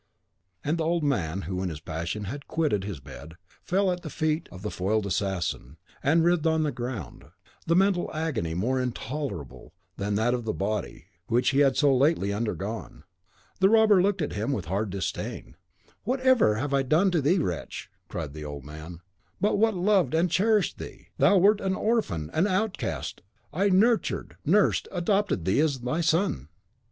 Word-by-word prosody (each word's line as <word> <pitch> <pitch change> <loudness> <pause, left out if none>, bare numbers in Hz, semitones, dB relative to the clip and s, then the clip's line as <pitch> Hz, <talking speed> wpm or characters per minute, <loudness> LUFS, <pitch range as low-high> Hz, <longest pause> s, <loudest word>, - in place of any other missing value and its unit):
and 160 +3 -1
the - - +1
old 165 0 0
man, 95 - 0
who 90 +2 -3
in 95 - -1
his 80 -3 -6
passion 85 +7 -4
had 140 +8 -6
quitted 150 -12 0
his 95 -7 -5
bed, 70 +4 -11 0.3
fell 190 +1 +1
at 180 0 -3
the 155 - -7
feet 155 +2 -1
of 90 +1 -11
the 105 - -3
foiled 105 +3 0
assassin, 90 - -2 0.2
and 160 +4 +3
writhed 170 -2 +2
on 160 -1 +2
the 150 - 0
ground, 120 - -6 0.4
the 165 - +3
mental 190 -1 +2
agony 140 - -2
more 125 +8 0
intolerable 125 - -5 0.2
than 100 +1 -1
that 110 +4 +2
of 125 -1 -2
the 110 - -2
body, 105 +2 -3 0.2
which 120 +2 +2
he 135 - +2
had 135 -2 +4
so 140 -3 +4
lately 130 - +2
undergone. 105 0 -4 0.6
The 190 0 +5
robber 215 -3 +5
looked 195 -2 +1
at - - -3
him 110 +6 -2
with 105 -11 -2
a - - -10
hard 100 +3 -1
disdain. 95 -3 -5 0.5
"What 255 +5 -1
have 260 -3 +4
I 105 - +4
ever 140 +1 +1
done 155 +9 +3
to 170 -3 +2
thee, 155 +8 +3
wretch?" 90 - -4 0.2
cried 75 -4 -5
the 75 0 -7
old 70 -2 -7
man, 80 +3 -9 0.4
"what 205 +3 +1
but 225 -2 +3
loved 185 -2 +2
and 170 +1 +2
cherished 210 +4 +2
thee? - - -10
Thou 200 - +5
wert 205 +3 +4
an 190 -1 0
orphan, 190 - -1
an 175 +5 +2
outcast. 200 +1 -2 0.3
I 195 +6 +2
nurtured, 220 +5 +2
nursed, 195 +6 +3
adopted 195 - 0
thee 95 - +2
as 150 -4 +1
my 125 +7 -1
son. 160 - +1
140 Hz, 185 wpm, -27 LUFS, -, 0.6 s, The